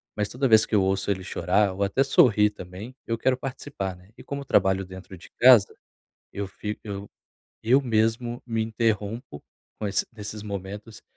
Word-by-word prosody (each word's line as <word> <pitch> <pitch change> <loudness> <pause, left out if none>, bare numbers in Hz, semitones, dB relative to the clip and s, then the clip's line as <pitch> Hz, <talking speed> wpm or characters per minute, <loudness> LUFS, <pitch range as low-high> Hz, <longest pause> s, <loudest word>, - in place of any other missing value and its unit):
Mas 105 -1 -1
toda 135 +2 0
vez 110 -2 +6
que - - -1
eu 100 - +4
ouço 95 +1 0
ele 95 -2 -1
chorar 95 +2 +1
ou 100 +2 -2
até 100 +8 +2
sorrir 110 -6 +4
também, 100 +5 -9
eu 115 0 -1
quero 130 +1 +1
participar, 130 -7 -5
né, 90 +3 -20
e - - -12
como 140 0 -5
trabalho 95 -5 +2
dentro 95 0 -11
de - - -15
casa 120 -5 +7 0.6
eu 100 0 -4
fico 105 +2 -6
eu 100 -1 -6 0.5
eu 125 +5 +4
mesmo 120 0 0
me 115 -2 -1
interrompo 110 - -2 0.4
com 105 - -1
ess 100 - 0
nesses 105 -1 -7
momentos 100 +2 -7
105 Hz, 175 wpm, -25 LUFS, 95-115 Hz, 0.6 s, casa